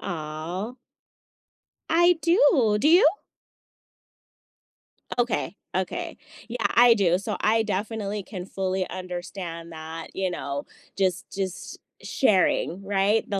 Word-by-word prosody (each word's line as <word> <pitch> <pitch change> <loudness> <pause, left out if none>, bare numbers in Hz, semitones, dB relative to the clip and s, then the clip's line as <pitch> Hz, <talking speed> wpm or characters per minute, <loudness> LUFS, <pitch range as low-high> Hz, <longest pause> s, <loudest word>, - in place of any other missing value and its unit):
Aw. 165 +7 -5 1.2
I 345 +2 +5
do. 285 - +4
Do 285 - +3
you? 340 +1 +7 2.1
Okay, 240 -3 0 0.2
okay. 185 0 -3 0.3
Yeah, 240 - -5 0.2
I 240 0 +8
do. 180 -5 +3
So 200 - -3
I 220 +1 +3
definitely 210 0 -3
can 185 -3 -7
fully 190 -1 -2
understand 180 -2 -6
that, 160 0 -7
you 190 -1 0
know, 140 -4 -4 0.3
just 190 -1 0
just 185 -2 -5 0.2
sharing, 190 -4 +1
right? 200 +2 +1
The 200 -2 0
195 Hz, 110 wpm, -25 LUFS, 180-220 Hz, 2.1 s, I